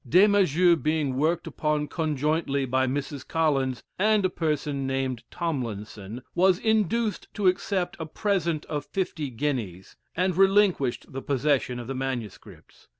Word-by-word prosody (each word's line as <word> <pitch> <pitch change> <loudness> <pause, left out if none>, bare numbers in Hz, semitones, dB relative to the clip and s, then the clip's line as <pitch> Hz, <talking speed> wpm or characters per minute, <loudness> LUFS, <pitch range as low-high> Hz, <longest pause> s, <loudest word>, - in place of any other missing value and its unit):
Des 180 - +7
Maizeaux 180 -4 +4
being 155 -4 0
worked 160 +5 +1
upon 150 -1 -1
conjointly 150 -2 0
by 130 +1 +1
Mrs. 140 +1 -4
Collins 135 -6 0 0.2
and 210 0 +3
a 185 - +1
person 150 -4 -1
named 135 -2 -2
Tomlinson, 115 - -4
was 185 0 +4
induced 220 +1 0
to 205 - -2
accept 185 0 +1
a 160 - -4
present 170 -4 -1
of 150 -2 -3
fifty 170 -7 -2
guineas, 115 -8 -3 0.2
and 185 0 +1
relinquished 190 -11 +2
the 135 - -4
possession 135 -2 0
of 120 - -6
the 135 - -4
manuscripts. 130 -6 -6
150 Hz, 140 wpm, -26 LUFS, 130-180 Hz, 0.2 s, Des